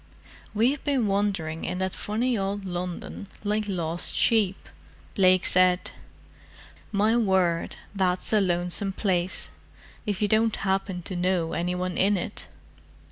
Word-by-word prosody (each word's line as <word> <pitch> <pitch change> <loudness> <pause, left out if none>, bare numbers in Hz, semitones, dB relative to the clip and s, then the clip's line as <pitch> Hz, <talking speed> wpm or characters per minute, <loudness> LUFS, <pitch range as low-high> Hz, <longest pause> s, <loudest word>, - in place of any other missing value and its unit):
"We've 250 +7 +2
been 275 -5 +1
wandering 195 -6 -1
in - - -3
that 190 0 -2
funny 235 +4 -1
old 200 -1 -2
London 180 +2 -5 0.2
like 210 0 0
lost 170 -3 +1
sheep," 210 -5 +2 0.5
Blake 185 -1 +4
said. 185 0 +3 1.0
"My 215 +2 +2
word, 190 -7 +1 0.2
that's 185 0 0
a 215 - +5
lonesome 180 +2 0
place, 185 -3 -1 0.6
if 205 -2 -1
you 210 - +2
don't 220 +1 +2
happen 190 -2 -2
to 185 - -3
know 180 -2 0
any 180 +1 -1
one 180 0 -2
in 200 +1 +3
it. 175 - -5
190 Hz, 135 wpm, -26 LUFS, 180-205 Hz, 1.0 s, a